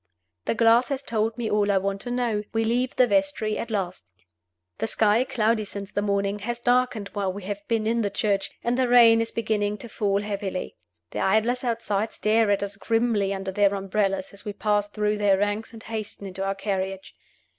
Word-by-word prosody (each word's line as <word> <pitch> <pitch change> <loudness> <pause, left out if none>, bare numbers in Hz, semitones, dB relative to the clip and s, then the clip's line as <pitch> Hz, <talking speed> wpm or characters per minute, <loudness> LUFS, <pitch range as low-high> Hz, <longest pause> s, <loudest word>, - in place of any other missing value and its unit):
The - - 0
glass 230 +2 +4
has 275 -1 -2
told 225 -2 -1
me 235 -2 -2
all 210 -1 +2
I 195 - +3
want 195 +1 -1
to 245 - -6
know. 240 -4 0
We 225 0 +1
leave 245 +3 0
the 255 - +5
vestry 205 0 +1
at 235 - -4
last. 185 - -3 0.7
The 110 - 0
sky, 215 - +3
cloudy 225 -3 +1
since 200 -1 -7
the 205 - -1
morning, 200 0 0
has 240 +4 -4
darkened 245 -4 +1
while 200 -2 -2
we 200 +1 -8
have 205 +1 -4
been 225 -2 0
in 230 +1 +1
the 205 - 0
church, 200 -1 0
and 240 +2 0
the 255 - +3
rain 235 -2 +7
is 230 - -2
beginning 210 -2 -1
to 235 - -9
fall 200 -2 0
heavily. 200 -3 -4 0.4
The - - -4
idlers 220 +6 +2
outside 225 -3 -1
stare 220 0 +2
at 200 0 +2
us 200 0 -4
grimly 225 -1 +1
under 195 -1 -3
their 200 +1 +3
umbrellas 195 -1 -1
as 200 - -12
we 205 - -5
pass 205 0 +1
through 210 0 -1
their 200 -2 +4
ranks 205 +3 -1
and 225 -1 -11
hasten 215 -2 -6
into 190 0 -5
our 195 0 -1
carriage. 195 -1 -3
210 Hz, 205 wpm, -25 LUFS, 200-230 Hz, 0.7 s, rain